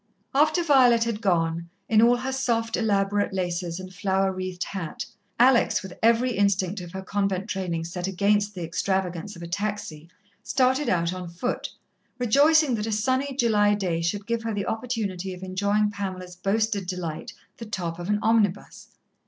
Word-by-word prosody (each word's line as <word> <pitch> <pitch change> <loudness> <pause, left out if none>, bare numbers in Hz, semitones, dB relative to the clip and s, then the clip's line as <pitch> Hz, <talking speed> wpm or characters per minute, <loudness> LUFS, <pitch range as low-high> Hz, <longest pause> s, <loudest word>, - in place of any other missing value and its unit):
After 310 +5 +3
Violet 255 -7 +5
had 230 -2 -3
gone, 170 -4 0 0.2
in 220 -1 +4
all 240 +1 +6
her 260 +2 -3
soft, 235 -4 0
elaborate 205 -2 +1
laces 175 -2 -2
and 185 0 -9
flower 190 0 +1
wreathed 185 -1 -4
hat, 180 -6 -5 0.3
Alex, 245 -3 +4
with 190 -2 -8
every 235 +3 +3
instinct 200 -2 +1
of 175 -1 -9
her 190 0 -5
convent 195 0 -1
training 180 -5 -2
set 175 +2 -4
against 205 +2 +1
the 180 - -5
extravagance 185 +3 -2
of 170 - -9
a - - -6
taxi, 175 -4 -4 0.3
started 260 +1 +1
out 170 0 +1
on 180 -1 -6
foot, 180 +9 -3 0.5
rejoicing 285 +4 +4
that 215 -1 -2
a - - -2
sunny 260 +5 0
July 210 -5 +3
day 180 -5 -1
should 195 +5 -2
give 235 0 -1
her 225 -2 -3
the 200 -1 -2
opportunity 210 -6 -3
of 180 - -11
enjoying 200 +3 +1
Pamela's 185 -3 -5
boasted 200 +1 0
delight, 175 -4 -4 0.3
the 230 - -7
top 175 -5 -4
of 175 +2 -5
an 210 - +3
omnibus. 215 -4 +1
200 Hz, 170 wpm, -25 LUFS, 180-230 Hz, 0.5 s, all